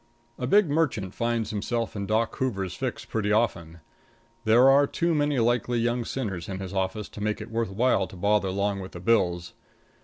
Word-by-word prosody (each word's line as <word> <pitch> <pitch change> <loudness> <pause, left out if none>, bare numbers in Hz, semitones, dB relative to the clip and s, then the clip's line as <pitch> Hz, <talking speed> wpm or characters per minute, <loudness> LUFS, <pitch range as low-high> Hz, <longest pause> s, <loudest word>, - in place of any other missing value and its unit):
A 125 - -2
big 205 +6 +5
merchant 140 - 0
finds 115 -1 -1
himself 115 +2 -2
in 100 -1 -3
Doc 110 +2 0
Hoover's 100 -9 -2
fix 130 +4 -4
pretty 105 -2 -1
often. 85 -7 0 0.6
There 120 +4 +6
are 140 +1 +6
too 170 +3 0
many 145 -2 +1
likely 120 +1 +1
young 120 +1 0
sinners 100 -11 -4
in 95 - -4
his 95 0 -6
office 95 +2 -2
to 105 - -10
make 105 0 -1
it 110 +1 -8
worth 115 -2 -1
while 100 -1 +1
to - - -13
bother 100 +1 +1
long 100 +1 -1
with 95 -1 -8
the 85 - -7
Bills. 90 -4 +1
110 Hz, 190 wpm, -26 LUFS, 95-120 Hz, 0.6 s, There